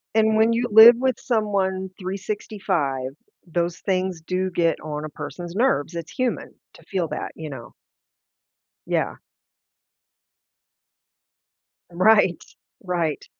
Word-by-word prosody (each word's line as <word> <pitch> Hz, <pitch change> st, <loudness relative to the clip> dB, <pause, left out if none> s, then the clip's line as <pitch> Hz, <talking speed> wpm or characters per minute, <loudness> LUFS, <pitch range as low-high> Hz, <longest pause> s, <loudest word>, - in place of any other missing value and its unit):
And, 220 Hz, 0 st, +3 dB
when 225 Hz, +1 st, +4 dB
you 240 Hz, +1 st, -1 dB
live 220 Hz, +3 st, +10 dB
with 260 Hz, -1 st, 0 dB
someone 195 Hz, -5 st, -1 dB
365, 190 Hz, -8 st, -3 dB, 0.4 s
those 170 Hz, 0 st, -2 dB
things 185 Hz, -3 st, -1 dB
do 185 Hz, +1 st, -1 dB
get 170 Hz, -2 st, +1 dB
on 150 Hz, 0 st, -5 dB
a 155 Hz, -, -5 dB
person's 175 Hz, +3 st, -7 dB
nerves. 215 Hz, -, +1 dB
It's 170 Hz, -2 st, -6 dB
human 255 Hz, -1 st, -2 dB, 0.2 s
to -, -, -17 dB
feel 180 Hz, -5 st, -2 dB
that, -, -, -5 dB
you 160 Hz, -1 st, -7 dB
know? 130 Hz, -4 st, -9 dB, 1.1 s
Yeah. -, -, -1 dB, 2.8 s
Right. 185 Hz, -1 st, +3 dB, 0.4 s
Right. 170 Hz, -5 st, -2 dB
185 Hz, 110 wpm, -23 LUFS, 170-215 Hz, 2.8 s, live